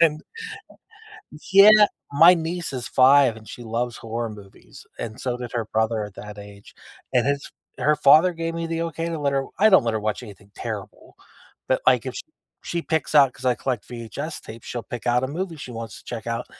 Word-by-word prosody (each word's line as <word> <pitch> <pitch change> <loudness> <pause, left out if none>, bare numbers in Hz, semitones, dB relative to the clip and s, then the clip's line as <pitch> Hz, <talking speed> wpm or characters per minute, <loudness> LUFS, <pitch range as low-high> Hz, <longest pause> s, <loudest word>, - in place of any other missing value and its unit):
and 155 -2 +3 1.3
Yeah, 200 +2 +9 0.4
my 165 +5 +7
niece 170 0 -4
is 125 -2 -5
5 130 -2 +5
and 110 -2 -14
she 120 - -9
loves 120 +1 -3
horror 115 0 -4
movies, 100 -2 -14
and 115 +2 -6
so 125 -2 -2
did 125 -2 -7
her 115 -2 -2
brother 110 0 0
at 105 - -10
that 105 +1 -10
age, 100 0 -13 0.4
and 125 -1 +3
his 140 0 -1 0.3
her 150 - +3
father 155 +6 +6
gave 165 0 -4
me 165 0 -3
the 165 0 -2
okay 165 0 -3
to 165 -2 -3
let 140 -1 0
her 135 0 0
I 215 +2 +6
don't 190 - +5
let 115 - 0
her 110 - -1
watch 105 +3 -2
anything 100 -1 -14
terrible, - - -7 0.5
but, - - +2
like, - - +4
if - - -4
sh - - -5 0.4
she 170 -1 -3
picks 160 -1 -2
out 140 -4 +6
'cause 130 - -8
I 125 - +3
collect 125 -6 -3
VHS 120 +6 -6
tapes, 115 +1 -11
she'll 120 -1 -5
pick 120 -2 -8
out 125 +2 +2
a - - -3
movie 170 +3 -4
she 135 -4 -9
wants 115 -3 -7
to - - -18
check 115 -2 -7
out, 115 +1 -3
125 Hz, 215 wpm, -23 LUFS, 115-160 Hz, 1.3 s, Yeah